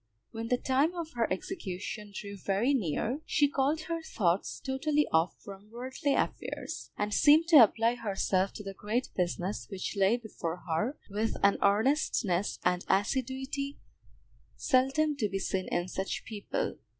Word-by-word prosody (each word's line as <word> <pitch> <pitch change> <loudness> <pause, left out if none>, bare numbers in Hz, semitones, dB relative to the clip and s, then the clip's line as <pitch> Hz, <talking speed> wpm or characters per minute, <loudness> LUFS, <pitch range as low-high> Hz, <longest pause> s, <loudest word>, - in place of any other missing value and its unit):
When 225 0 -5
the 250 - +2
time 275 +8 +1
of 335 -2 -5
her 235 -2 -1
execution 205 - -5
drew 200 0 -7
very 200 +7 +1
near, 235 - -1
she 290 - +3
called 285 +3 0
her 330 +1 -3
thoughts 185 - 0
totally 290 +3 0
off 160 +2 +2
from 200 +1 -11
worldly 260 +4 -2
affairs, - - -3
and 210 0 -1
seemed 305 +7 +6
to 325 - +9
apply 230 +2 +2
herself 195 -4 0
to 210 - -8
the 195 -1 -6
great 215 +6 -2
business 180 +2 -2
which 195 0 -4
lay 200 +4 +3
before 180 -7 -5
her, 195 - -1
with 215 +3 -1
an 200 0 +4
earnestness 205 - +2
and 180 0 +2
assiduity 265 +6 -1 0.8
seldom 280 +3 +2
to 215 -6 0
be 195 - -2
seen 190 -1 -2
in 175 +1 -1
such 190 +1 -3
people. 220 - -3
225 Hz, 150 wpm, -30 LUFS, 195-275 Hz, 0.8 s, to